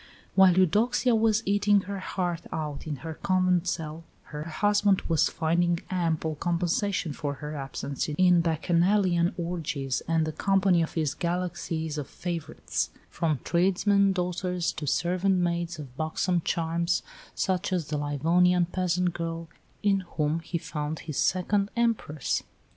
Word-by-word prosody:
While 190 -2 +6
Eudoxia 220 +7 +3
was 220 -1 +3
eating 205 0 +3
her 200 +1 -5
heart 175 -2 -2
out 150 -1 -4
in 150 - -2
her 160 - -4
convent 185 0 +1
cell, 160 -2 -3 0.3
her 150 +1 -4
husband 205 +3 +2
was 165 -2 +2
finding 170 +1 +1
ample 165 -3 0
compensation 175 +1 -1
for 145 0 -3
her 150 +2 -6
absence 140 +1 -4
in 175 +3 +4
Bacchanalian 175 +2 +2
orgies 160 -6 -2
and 165 -1 +2
the 155 - -2
company 190 +1 +2
of 160 - -3
his 155 -4 0
galaxies 170 -3 -2
of 145 - -5
favourites, 170 -3 -3 0.2
from 155 -7 -1
tradesmen's 195 +3 +3
daughters 180 -1 -1
to 150 - -6
servant 180 +6 +1
maids 170 -1 -1
of 135 -5 -9
buxom 165 +3 0
charms, 170 +1 0 0.3
such 190 +1 0
as 175 -5 -1
the 150 - -1
Livonian 170 +5 +3
peasant 180 0 0
girl, 165 -1 -4 0.3
in 200 -1 +3 0.2
whom 155 +1 +1
he 170 +1 -3
found 150 -1 -4
his 155 -4 -6
second 200 +2 +1
Empress. 230 - 0
170 Hz, 140 wpm, -27 LUFS, 160-185 Hz, 0.3 s, While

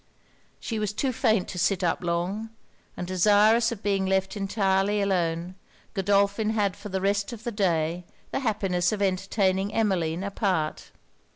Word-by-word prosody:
She 225 -2 -3
was 210 -1 -2
too 260 +4 -1
faint 220 -4 +1
to 180 - -5
sit 190 +1 +1
up 175 +1 0
long; 180 +6 -2 0.5
and 180 - -3
desirous 210 +5 +4
of 220 -4 -7
being 195 -2 +1
left 190 +1 0
entirely 195 0 +1
alone, 175 -3 0 0.4
Godolphin 200 +1 +2
had 205 -3 0
for 205 +1 -9
the 190 0 -1
rest 200 +2 0
of 230 -1 -9
the 240 - -3
day 175 -4 0 0.3
the - - -1
happiness 200 -7 0
of 215 - -2
entertaining 195 +1 0
Emmeline 185 -6 0
apart. 190 -6 -1
195 Hz, 155 wpm, -26 LUFS, 185-210 Hz, 0.5 s, desirous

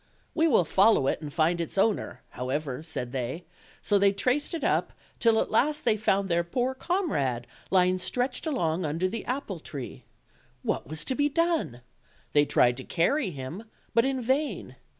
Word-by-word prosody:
"We 325 0 +3
will 225 - +4
follow 195 -3 +4
it 135 - 0
and 150 -2 -6
find 165 +2 +1
its 170 - -5
owner, 210 +2 0
however," 130 +1 -3
said 125 -6 -5
they; 130 +6 -4 0.4
so 205 -1 +3
they 200 0 +5
traced 260 - 0
it 320 - -5
up, - - +1 0.3
till 230 -2 +4
at - - -1
last 295 +6 +2
they 225 -3 +4
found 200 -2 +1
their 170 -1 +1
poor 245 +9 -1
comrade 205 - -1 0.2
lying 185 0 +3
stretched 250 - -2
along 180 - 0
under 165 +4 0
the 225 +5 -4
apple 245 -8 -3
tree. 135 -4 -8 0.6
What - - -2
was 155 +1 -3
to - - 0
be 290 +2 +1
done? 325 - 0 0.5
They 145 0 +5
tried 120 -3 +3
to 130 - -6
carry 200 - +1
him, 160 +7 -7 0.3
but 230 0 +4
in 265 -1 -1
vain. 275 +5 -1
190 Hz, 175 wpm, -27 LUFS, 155-255 Hz, 0.6 s, they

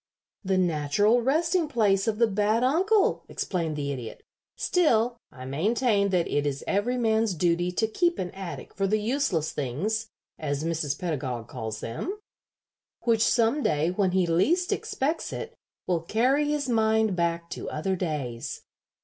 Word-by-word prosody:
"The 190 -1 +1
natural 180 +7 +2
resting 320 +6 +1
place 210 -7 +2
of 215 -1 0
the 235 - +5
bad 215 +2 +1
uncle," 380 +11 +2
explained 165 -5 -2
the 140 -1 -2
Idiot. 125 -5 -7 0.3
"Still, 245 -9 +2 0.2
I 130 -1 -10
maintain 200 - +1
that 180 -3 +1
it 145 0 0
is 140 0 -3
every 225 +6 0
man's 220 -4 +1
duty 175 +1 +1
to 220 - +1
keep 345 +10 +1
an 180 -1 -3
attic 190 -2 -7
for 195 0 0
the 215 +2 +2
useless 210 - 0
things, 190 - -2 0.3
as 145 -1 -2
Mrs. 160 -3 -1
Pedagog 130 - -3
calls 110 -1 -5
them, 360 - -4 0.8
which 230 -2 +3
some 235 +6 +3
day, 155 - +1
when 190 0 +1
he 185 0 +2
least 270 - +2
expects 305 +5 -2
it, - - -6 0.3
will 175 -3 0
carry 255 - +2
his 295 -2 -1
mind 220 -3 +2
back 170 -1 -1
to - - -5
other 190 +5 -1
days. 145 -10 -4
195 Hz, 155 wpm, -27 LUFS, 160-235 Hz, 0.8 s, the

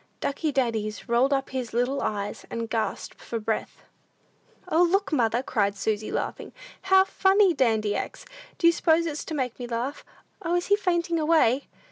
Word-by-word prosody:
Ducky 300 +2 -1
Daddies 225 -6 -1
rolled 245 +3 +3
up 270 -1 0
his 255 -4 -4
little 245 +4 0
eyes, 205 -1 -3
and 230 0 -4
gasped 225 -2 -3
for 230 - -4
breath. 220 0 -3 0.8
"O, 340 -1 +2
look, 370 +1 +2
mother!" 235 -2 +1
cried 200 -6 0
Susy, 215 +1 -2
laughing; - - -4 0.3
"how 380 0 +5
funny 385 -1 +3
Dandy 220 -7 +1
acts! - - -5 0.3
Do - - -1
you 335 - +7
suppose 335 0 +2
it's 310 -2 -3
to 315 - -4
make 255 -4 -3
me 245 - -5
laugh? 240 +4 -3 0.4
O, 345 -1 0
is 350 +1 -1
he 405 - +6
fainting 345 -4 0
away?" 300 -5 +3
265 Hz, 170 wpm, -26 LUFS, 230-335 Hz, 0.8 s, you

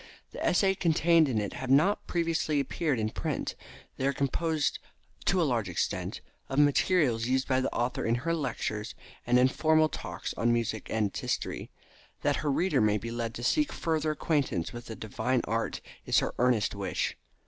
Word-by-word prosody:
The - - -6
essays 195 -1 +3
contained 165 -2 +4
in 115 -4 +1
it 100 -2 -3
have 130 0 -5
not 155 +10 +3
previously 165 -3 0
appeared 140 +1 -1
in 110 -1 -1
print. - - -3 0.4
They 135 - 0
are 140 - +1
composed 150 +3 0 0.5
to 185 - +3
a - - +4
large 120 - 0
extent 90 - -2 0.3
of 135 - -3
materials 145 -5 +3
used 130 +1 +1
by 130 -1 +2
the - - -1
author 120 +1 -1
in 115 - +2
her 165 - +1
lectures 115 -7 -3 0.3
and 120 +1 +4
informal 155 +5 +4
talks - - -5
on 120 +1 +1
music 115 -2 -1
and 110 -2 +1
its - - -5
history. - - -3 0.5
That - - +2
her 150 - 0
readers 180 +3 +2
may 105 -1 +3
be 115 +3 -5
led 115 -1 -3
to 120 - -6
seek 300 - +2
further 160 -1 -1
acquaintance 145 - -1
with 120 0 -8
the 110 - -6
divine 115 +4 -1
art 115 +1 -2 0.2
is - - +2
her - - +1
earnest 120 -4 +2
wish. - - -2
130 Hz, 180 wpm, -29 LUFS, 115-155 Hz, 0.5 s, contained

